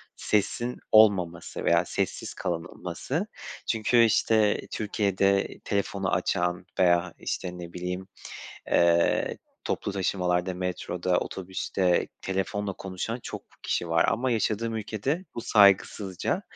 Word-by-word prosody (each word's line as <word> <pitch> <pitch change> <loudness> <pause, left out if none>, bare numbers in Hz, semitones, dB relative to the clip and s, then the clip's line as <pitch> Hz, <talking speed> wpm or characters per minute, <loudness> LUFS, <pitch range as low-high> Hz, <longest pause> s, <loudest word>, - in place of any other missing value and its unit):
sesin 120 +4 0
olmaması 95 -6 +4
veya - - +4
sessiz - - -3
kalınılması. 85 -2 -3 0.4
Çünkü, 115 +2 +4
işte, 110 -1 +3
Türkiye'de 100 -2 +1 0.2
telefonu 100 -1 -1
açan 90 +1 0
veya, 85 -1 +3
işte, 90 0 -4
ne 85 -1 -8
bileyim, 90 +1 -4 0.6
eee, 85 0 +3 0.3
toplu - - -2
taşımalarda, 90 -2 0
metroda, 90 0 -1
otobüste 95 -1 -1
telefonla 95 +1 -2
konuşan 95 +6 -5
çok - - -6 0.2
kişi 85 - -1
var 80 0 +4
ama 125 +2 0
yaşadığım 115 0 0
ülkede 110 - -2
bu 115 - -3
saygısızca. 100 -3 +3
95 Hz, 105 wpm, -27 LUFS, 90-105 Hz, 0.6 s, olmaması